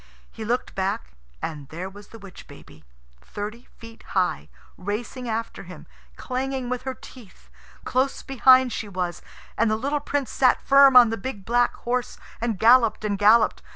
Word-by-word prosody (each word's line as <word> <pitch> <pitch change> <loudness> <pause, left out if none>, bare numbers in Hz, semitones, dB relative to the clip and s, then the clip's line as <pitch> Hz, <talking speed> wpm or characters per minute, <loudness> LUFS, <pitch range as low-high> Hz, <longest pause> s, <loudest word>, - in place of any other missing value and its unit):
He 225 - -8
looked 240 +3 -2
back, 125 - -3 0.3
and 145 -4 -6
there 175 +4 -6
was 200 +1 -13
the 225 - -13
witch 195 -4 -13
baby, 110 - -16 0.4
thirty 215 +4 -8
feet 230 -1 -13 0.2
high, 185 -1 0 0.3
racing 230 +6 -5
after 225 +1 -4
him, - - -12 0.3
clanging 260 -1 -4
with 250 -1 -3
her 260 - -5
teeth. 190 - -16 0.3
Close 260 +2 -1
behind 260 -1 +4
she 220 - -5
was, 180 -2 -4 0.4
and 230 0 +3
the 215 - +1
little 280 +6 -2
Prince 285 -4 -3
sat 255 -2 +3
firm 275 -1 +5
on 240 -3 +8
the 225 - -2
big 200 -3 -7
black 240 +1 +1
horse, 250 +1 -3 0.2
and 230 -3 -1
galloped 230 +1 +4
and 200 -2 -2
galloped. 215 +2 +4
230 Hz, 165 wpm, -24 LUFS, 200-255 Hz, 0.4 s, on